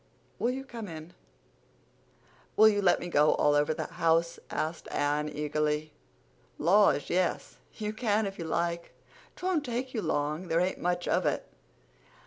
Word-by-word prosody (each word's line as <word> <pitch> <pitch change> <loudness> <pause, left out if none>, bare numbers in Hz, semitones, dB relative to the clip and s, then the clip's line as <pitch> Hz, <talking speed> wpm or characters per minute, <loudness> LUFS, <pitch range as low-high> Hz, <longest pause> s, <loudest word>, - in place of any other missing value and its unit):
Will 235 - +1
you 265 +2 -3
come 230 -5 -7
in?" 160 0 -9 1.4
"Will 220 - +8
you 205 -1 +3
let 180 -3 +4
me - - -5
go 150 -3 +4
all 145 - +3
over 145 +1 +2
the 155 - -3
house?" 165 0 +1
asked 160 +2 -3
Anne 150 +1 0
eagerly. 150 +1 -1 0.6
"Laws, 190 -2 +3
yes, 180 0 -1 0.2
you 210 -1 -3
can 215 -1 +1
if 195 -1 -6
you 165 - -4
like. 170 +1 -2 0.4
'Twon't 360 -4 0
take 255 0 -3
you 225 - -1
long—there 155 +2 -1
ain't 180 +2 0
much 175 0 -1
of - - +2
it. - - -1
170 Hz, 150 wpm, -29 LUFS, 155-210 Hz, 1.4 s, Will